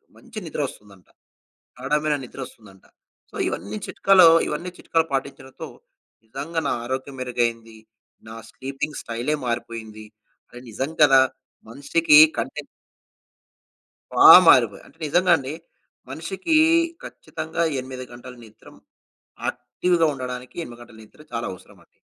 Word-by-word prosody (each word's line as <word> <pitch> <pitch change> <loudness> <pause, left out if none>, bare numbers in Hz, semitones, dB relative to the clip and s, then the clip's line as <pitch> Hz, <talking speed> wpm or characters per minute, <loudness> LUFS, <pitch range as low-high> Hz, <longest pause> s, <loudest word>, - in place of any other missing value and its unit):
మంచి 230 -3 -10
నిద్ర 155 - -4
వస్తుందంట. 100 -6 -16 0.7
గాడమైన 150 +3 0
నిద్ర 125 - -12
వస్తుందంట. 100 -6 -18 0.5
సో, - - -14
ఇవన్నీ 100 +5 -5
చిట్కాలు, 190 -3 +5 0.2
ఇవన్నీ 170 +4 -4
చిట్కాలు 165 -1 0
పాటించడంతో 135 -1 -5 0.6
నిజంగా 140 +8 -5
నా - - 0
ఆరోగ్యం 130 +2 -5
మెరుగైంది. 115 -3 -3 0.5
నా 110 - -9
స్లీపింగ్ 135 +3 -6
స్టైలే 120 +6 -3
మారిపోయింది. 115 -2 -5 0.4
అరె! 120 0 -12
నిజం 135 +7 -4
కదా! 135 -2 +6 0.5
మనిషికి 150 +5 +3 0.2
కంటే - - -4 1.5
బా - - +7 0.2
మారిపోయ. - - +5
అంటే - - -21
నిజంగా 175 +4 +2
అండి. 135 +1 -6 0.6
మనిషికి 180 - -3 0.5
ఖచ్చితంగా 160 +1 -5 0.2
8 130 0 -8
గంటలు 125 +1 -12
నిద్రమ్ 110 -1 -17 0.7
యాక్టివ్‌గా 175 -2 0
ఉండడానికి 125 -1 -7
8 120 -4 -11
గంటల 120 -2 -15
నిద్ర 110 - -23
చాలా 115 0 -3
అవసరమండి. 95 0 -17
130 Hz, 115 wpm, -22 LUFS, 115-150 Hz, 1.5 s, బా